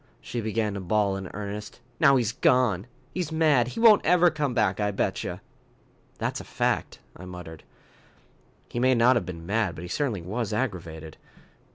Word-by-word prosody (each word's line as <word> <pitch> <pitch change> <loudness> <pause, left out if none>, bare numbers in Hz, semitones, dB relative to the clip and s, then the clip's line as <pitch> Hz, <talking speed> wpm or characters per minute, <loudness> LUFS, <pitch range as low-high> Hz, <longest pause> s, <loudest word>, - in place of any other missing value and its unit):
She 120 - -5
began 110 -1 -1
to 100 - -4
bawl 100 +1 +1
in 95 -2 -6
earnest. 105 +1 -6 0.2
"Now 140 -3 +6
he's 120 -5 +1
gone. 115 -5 +2 0.3
He's 180 -4 -3
mad. 155 -7 +3
He 125 - -6
won't 225 -3 +7
ever 175 0 +5
come 145 -5 -2
back, 105 -5 +1
I 105 -1 +1
betcha." 100 - -2 0.8
"That's - - -2
a - - -10
fact," - - -1 0.2
I 90 - -10
muttered. 90 -3 -9 1.0
"He 120 - -4
may 130 +1 +4
not 120 +2 +5
have 110 -6 -1
been 85 -2 -7
mad, 100 -3 0
but 80 - -8
he - - -6
certainly 110 - -2
was 110 +4 -3
aggravated. 85 -9 -4
110 Hz, 175 wpm, -26 LUFS, 95-130 Hz, 1.0 s, won't